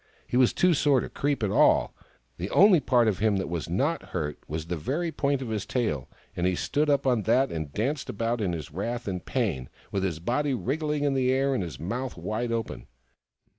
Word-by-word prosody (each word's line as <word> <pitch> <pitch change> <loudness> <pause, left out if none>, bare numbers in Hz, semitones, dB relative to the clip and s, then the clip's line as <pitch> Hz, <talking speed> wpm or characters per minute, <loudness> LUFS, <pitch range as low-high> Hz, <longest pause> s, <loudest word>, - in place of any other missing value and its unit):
He - - -4
was 125 -1 +5
too 180 -1 +3
sore 145 -3 +3
to - - -4
creep 140 -4 -1
at 100 - +1
all: - - +4 0.4
the 90 +3 -4
only 195 - +6
part 120 -5 +3
of 105 -4 0
him 105 -1 +2
that 95 - -1
was 85 -1 -4
not 140 - 0
hurt 75 -4 -4
was 80 +1 -4
the 90 +1 -3
very 145 - -2
point 140 -3 0
of 120 - -6
his 105 -2 -2
tail, 75 - -2 0.3
and 90 +1 0
he 90 - +1
stood 150 - 0
up 140 -1 +2
on 125 -4 +3
that 125 +5 +2
and 80 -3 -4
danced 135 - -2
about 115 0 -1
in 95 -4 0
his 80 -4 -5
wrath 115 +8 -4
and 90 -3 -3
pain, 65 -1 -2 0.2
with 100 - -1
his 90 -5 -1
body 130 - 0
wriggling 150 +4 -1
in 145 -1 +2
the 130 -1 +2
air, 135 +1 +2
and 130 - 0
his 80 -8 -6
mouth 120 - -4
wide 115 +2 -3
open. 115 -1 -4
115 Hz, 220 wpm, -27 LUFS, 90-135 Hz, 0.4 s, only